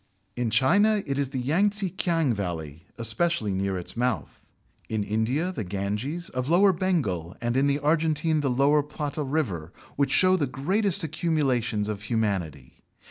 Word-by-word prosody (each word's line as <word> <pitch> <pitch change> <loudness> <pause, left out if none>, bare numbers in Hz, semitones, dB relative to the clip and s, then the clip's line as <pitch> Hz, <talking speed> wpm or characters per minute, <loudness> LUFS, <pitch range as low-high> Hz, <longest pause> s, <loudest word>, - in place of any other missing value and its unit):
In 120 -2 -1
China 200 - +3
it 140 0 -2
is 140 -2 0
the 135 - -5
Yang 160 +11 +2
tze 200 -3 -3
kiang 165 -8 +1
valley 85 -5 -5
(especially 115 - 0
near 95 0 -1
its 90 - -5
mouth); 120 - -2 0.5
in 110 -2 -1
India, 115 - 0
the 145 - -4
Ganges, 105 - -3
of 125 +2 -3
lower 190 +3 +5
Bengal, 130 - -1
and 120 0 -1
in 135 +2 +3
the 140 0 +2
Argentine 155 +1 +1
the 140 - 0
La 140 +4 +3
Plata 150 0 -4
River, 125 - -2 0.3
which 140 -1 +2
show 185 +4 +5
the 150 -6 0
greatest 185 - 0
accumulations 135 -9 0
of 105 -2 -4
humanity. 95 - -3
135 Hz, 160 wpm, -26 LUFS, 105-160 Hz, 0.5 s, lower